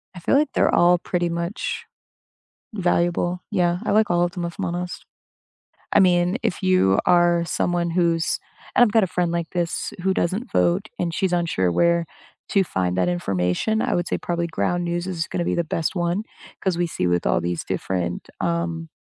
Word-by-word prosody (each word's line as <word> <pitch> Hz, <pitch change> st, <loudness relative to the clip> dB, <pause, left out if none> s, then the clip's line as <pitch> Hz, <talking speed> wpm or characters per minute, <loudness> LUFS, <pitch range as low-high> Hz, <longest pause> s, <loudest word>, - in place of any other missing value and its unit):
I -, -, -7 dB
feel 170 Hz, -, +1 dB
like 300 Hz, -1 st, +2 dB
they're -, -, +2 dB
all 175 Hz, +1 st, +5 dB
pretty 175 Hz, 0 st, -1 dB
much 170 Hz, +5 st, -3 dB, 0.9 s
valuable. 175 Hz, -1 st, 0 dB
Yeah, 175 Hz, -4 st, +1 dB
I -, -, -1 dB
like 215 Hz, -1 st, +3 dB
all 175 Hz, 0 st, +3 dB
of 175 Hz, 0 st, 0 dB
them, 175 Hz, -2 st, -4 dB
if 170 Hz, 0 st, -5 dB
I'm -, -, -2 dB
honest. 175 Hz, +1 st, -4 dB, 0.9 s
I -, -, +5 dB
mean, 180 Hz, 0 st, +3 dB
if 215 Hz, -4 st, -2 dB
you 185 Hz, -, +3 dB
are 175 Hz, -1 st, +4 dB
someone 170 Hz, 0 st, 0 dB
who's 170 Hz, -1 st, +1 dB, 0.4 s
and -, -, +7 dB
I've 215 Hz, -, -1 dB
got 225 Hz, -2 st, +4 dB
a -, -, -1 dB
friend 175 Hz, -1 st, 0 dB
like 170 Hz, -1 st, -2 dB
this 175 Hz, -2 st, -2 dB
who 190 Hz, 0 st, +1 dB
doesn't 200 Hz, +10 st, -1 dB
vote, 190 Hz, +5 st, +2 dB
and 170 Hz, -2 st, -1 dB
she's 190 Hz, +1 st, 0 dB
unsure 160 Hz, -, +1 dB
where 170 Hz, -, +2 dB, 0.4 s
to 195 Hz, -1 st, +3 dB
find 90 Hz, -, -1 dB
that 90 Hz, -1 st, +2 dB
information. 90 Hz, -, 0 dB
I -, -, 0 dB
would 175 Hz, 0 st, 0 dB
say -, -, -1 dB
probably 170 Hz, -1 st, -2 dB
Ground 175 Hz, +1 st, -1 dB
News 175 Hz, +1 st, -2 dB
is 170 Hz, -3 st, -2 dB
gonna 175 Hz, -, -2 dB
be -, -, 0 dB
the 170 Hz, -, 0 dB
best 160 Hz, +2 st, -2 dB
one 175 Hz, +5 st, 0 dB, 0.4 s
'cause 190 Hz, -3 st, 0 dB
we 175 Hz, -, +1 dB
see 90 Hz, -, -2 dB
with 85 Hz, 0 st, +1 dB
all 85 Hz, -, +2 dB
these 85 Hz, 0 st, -3 dB
different, 90 Hz, -2 st, -3 dB
um 170 Hz, -1 st, -2 dB
175 Hz, 195 wpm, -23 LUFS, 165-180 Hz, 0.9 s, and